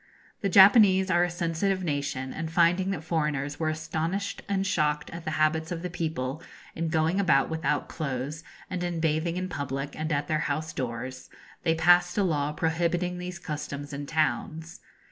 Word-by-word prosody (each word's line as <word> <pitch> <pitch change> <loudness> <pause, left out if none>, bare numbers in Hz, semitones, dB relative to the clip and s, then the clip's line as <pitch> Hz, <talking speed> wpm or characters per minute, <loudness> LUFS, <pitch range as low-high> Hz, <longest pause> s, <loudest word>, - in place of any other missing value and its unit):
The 200 - 0
Japanese 190 0 +7
are 175 0 +4
a 175 - +1
sensitive 175 +2 -1
nation, 140 -4 -2
and 160 0 -4
finding 175 +3 +3
that 185 -6 -3
foreigners 150 -4 -1
were 160 -1 +1
astonished 160 +5 -3
and 195 -1 0
shocked 150 -6 0
at 170 0 -8
the - - -1
habits 160 +1 +1
of 170 0 -4
the 180 - -4
people, 155 -4 -3 0.3
in 165 0 -2
going 160 +4 +1
about 155 -7 +3
without 160 0 -1
clothes, 145 +1 -4 0.2
and 180 -1 -3
in 175 -1 -2
bathing 160 +2 0
in 185 0 -2
public 140 -3 -4
and 155 +1 -3
at 145 -1 0
their 155 -1 +1
house 155 +3 -2
doors, 125 0 -5 0.3
they 165 -1 +2
passed 175 +3 +4
a 205 - +3
law 150 -5 0
prohibiting 170 +3 0
these 180 0 -5
customs 145 -2 -6
in 140 0 -5
towns. 155 - -1
160 Hz, 175 wpm, -27 LUFS, 150-175 Hz, 0.3 s, Japanese